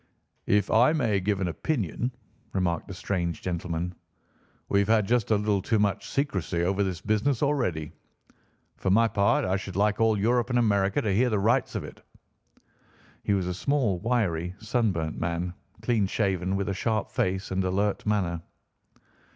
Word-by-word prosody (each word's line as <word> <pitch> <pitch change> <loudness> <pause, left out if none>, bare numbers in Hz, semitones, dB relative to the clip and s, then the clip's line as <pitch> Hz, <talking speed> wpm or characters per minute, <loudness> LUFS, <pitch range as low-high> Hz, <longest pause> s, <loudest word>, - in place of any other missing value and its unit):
"If 105 -1 +2
I 125 +7 +5
may 115 -10 +1
give 100 +1 0
an 95 - +1
opinion," 120 - -2 0.4
remarked 90 -3 0
the 95 - -7
strange 85 -3 -2
gentleman, 90 0 -3 0.7
"we've 100 0 +2
had 110 -2 +3
just 120 -2 +1
a 110 - +4
little 105 -1 +1
too 110 +4 +1
much 100 -2 0
secrecy 95 - -1
over 95 +3 +1
this 90 -4 -3
business 110 +5 +1
already. 105 - 0 0.9
For 95 - -1
my 115 +4 +5
part, 100 -2 +2
I 95 +1 +1
should 95 -1 -7
like 105 +2 +2
all 110 -1 +4
Europe 120 +4 +1
and 125 - +1
America 100 -4 +2
to 105 -3 +1
hear 125 +6 +3
the 110 - +1
rights 105 +4 +1
of - - -2
it." - - -11 1.2
He 100 - +1
was 95 -2 0
a 90 - -2
small, 120 -3 0
wiry, 90 -7 0
sunburnt 105 -8 -1
man, 85 +1 -2 0.3
clean 110 -5 +2
shaven, 95 -2 0
with 100 0 -1
a - - 0
sharp 110 +2 -1
face 95 +1 -1
and 95 0 0
alert 100 +2 0
manner. 95 -6 0
100 Hz, 165 wpm, -27 LUFS, 90-110 Hz, 1.2 s, I